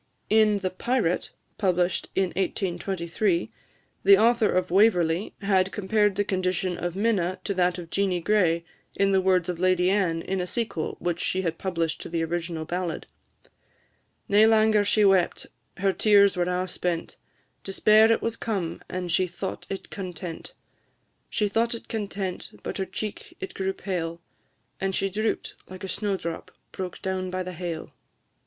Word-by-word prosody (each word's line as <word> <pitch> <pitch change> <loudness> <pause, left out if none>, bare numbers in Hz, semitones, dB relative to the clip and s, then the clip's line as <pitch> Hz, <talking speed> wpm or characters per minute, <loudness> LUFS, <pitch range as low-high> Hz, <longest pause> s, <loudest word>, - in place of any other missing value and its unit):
In 215 -1 +5
the 190 -2 -2
"Pirate," 205 -3 0 0.3
published 180 -2 +1
in 190 -1 +2
1823, 180 0 -1 0.5
the 195 0 +8
author 230 +1 +4
of 180 -1 0
"Waverley" 180 -3 +3
had 190 -1 +2
compared 205 0 +1
the 205 - +1
condition 185 -2 -1
of 175 0 -4
Minna 195 -4 +1
to 200 - -1
that 180 -1 +1
of 170 -2 -8
Jeanie 195 -3 +1
Gray, 170 -3 +2 0.3
in 195 0 +2
the 190 -1 +4
words 185 -2 +2
of 175 -2 -3
Lady 185 0 +3
Anne, 175 -5 +1
in 190 -1 -2
a 180 - -3
sequel 225 -7 -3
which 175 0 -2
she 190 +1 -1
had 165 -2 -2
published 165 -4 -2
to - - -7
the 165 -1 -1
original 165 -1 -3
ballad: 175 0 -3 1.2
"Nae 210 +2 +6
langer 220 -1 +4
she 205 +1 +3
wept, 190 -3 +3 0.3
her 195 0 +1
tears 200 +1 +5
were 175 -1 +1
a' 180 +1 -1
spent; 175 -2 -3 0.5
Despair 215 +3 +5
it 225 - +1
was 230 0 -1
come, 195 -8 -3
and 180 -1 -3
she 185 +2 +3
thought 180 +2 -6
it 195 - -6
content; 180 -3 -6 0.7
She 210 - +1
thought 230 +3 +1
it 230 - -10
content, 200 -4 -4
but - - -4
her 190 - 0
cheek 215 +2 -6
it 190 - -6
grew 190 0 -1
pale, 170 -4 -4 0.6
And 195 -1 -1
she 195 - 0
droop'd 215 +3 -1 0.2
like 185 0 -9
a - - -3
snowdrop 190 -4 -3 0.2
broke 185 -2 -6
down 185 -1 -2
by 185 0 -2
the 185 0 -6
hail!" 170 -1 -5
185 Hz, 160 wpm, -26 LUFS, 175-205 Hz, 1.2 s, the